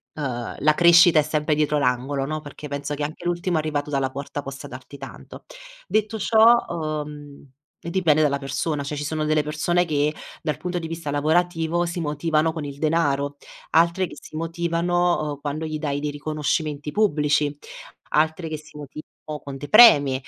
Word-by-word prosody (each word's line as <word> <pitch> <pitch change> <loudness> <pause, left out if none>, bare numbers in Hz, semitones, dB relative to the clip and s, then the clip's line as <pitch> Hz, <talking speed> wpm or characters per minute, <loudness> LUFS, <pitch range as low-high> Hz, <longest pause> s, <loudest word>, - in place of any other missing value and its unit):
ehm, 125 -6 -4
la 155 +1 +4
crescita 170 -1 +7
è - - +3
sempre 150 0 0
dietro 150 0 +1
l'angolo, 135 +1 0
no, 155 +2 -3
perché 150 0 -10
penso 140 +1 -4
che 145 - -4
anche 155 +4 -6
l'ultimo 175 0 0
arrivato 150 -2 -2
dalla 135 -2 0
porta 140 +2 -5
possa 135 +1 -8
darti 130 +2 -10
tanto. 135 0 -11 0.4
Detto 215 +1 0
ciò, 225 +3 +6
uhm, 150 -3 -5 0.4
dipende 170 -3 +2
dalla 140 -2 +2
persona. 145 +2 -2
Cioè, 145 +2 -4
ci 145 - -3
sono 155 +1 -2
delle 155 0 +2
persone 165 +4 0
che 150 -2 0 0.3
dal 150 -3 -1
punto 180 0 -4
di 165 - -5
vista 165 -2 -5
lavorativo 165 +3 +1
si 170 +1 -4
motivano 155 +1 0
con 160 -2 -5
il 140 -1 -7
denaro. 145 -3 0 0.3
Altre 170 +3 +3
che - - -11
si - - -12
motivano, 170 0 0
uhm, 145 - -7
quando 150 +2 -3
gli 155 -1 -4
dai 145 -2 -2
dei 150 0 -3
riconoscimenti 150 0 -2
pubblici, 150 -7 +1 0.6
altre 160 +2 +1
che 155 - -4
si 155 0 -15
motivano 150 +1 -10 0.3
con 140 -1 -7
dei 145 +2 -7
premi, 210 - +8
155 Hz, 175 wpm, -23 LUFS, 145-165 Hz, 0.6 s, premi